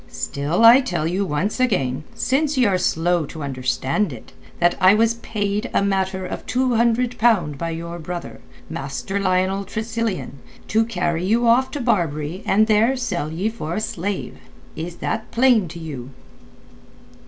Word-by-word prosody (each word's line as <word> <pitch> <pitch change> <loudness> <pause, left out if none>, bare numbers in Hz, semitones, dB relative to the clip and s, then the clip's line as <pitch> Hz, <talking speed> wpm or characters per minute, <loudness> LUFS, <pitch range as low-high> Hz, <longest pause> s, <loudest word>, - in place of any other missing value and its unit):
Still, 150 +10 0
I 240 +4 +9
tell 175 - -2
you 180 +4 0
once 170 - -1
again, 150 - 0
since 280 +2 0
ye 255 - +4
are 190 -3 +2
slow 170 -2 +1
to 160 -1 -7
understand 135 +7 -1
it, 120 -4 -11 0.3
that 175 0 +3
I 185 +2 +7
was 225 +1 +3
paid 210 +1 -2
a - - +3
matter 190 -1 -1
of - - -5
two 255 0 +1
hundred 235 +1 +1
pound 180 -12 +2
by 165 - -2
your 170 +1 -5
brother, 170 -8 -6 0.3
Master 140 +8 -4
Lionel 190 +1 +1
Tressilian, 220 -6 -3 0.3
to 225 +1 +3
carry 175 -6 -1
you 225 +5 +2
off 250 +3 +4
to 290 - -5
Barbary 170 - -1
and 215 +2 +4
there 225 +4 +3
sell 180 -11 -2
you 190 +7 -1
for 170 -7 -5
a - - 0
slave. 190 - -4 0.4
Is 170 +2 -5
that 220 -1 -2
plain 235 -5 +3
to 165 +2 -9
you?" 145 -7 -7
190 Hz, 165 wpm, -21 LUFS, 165-225 Hz, 0.4 s, I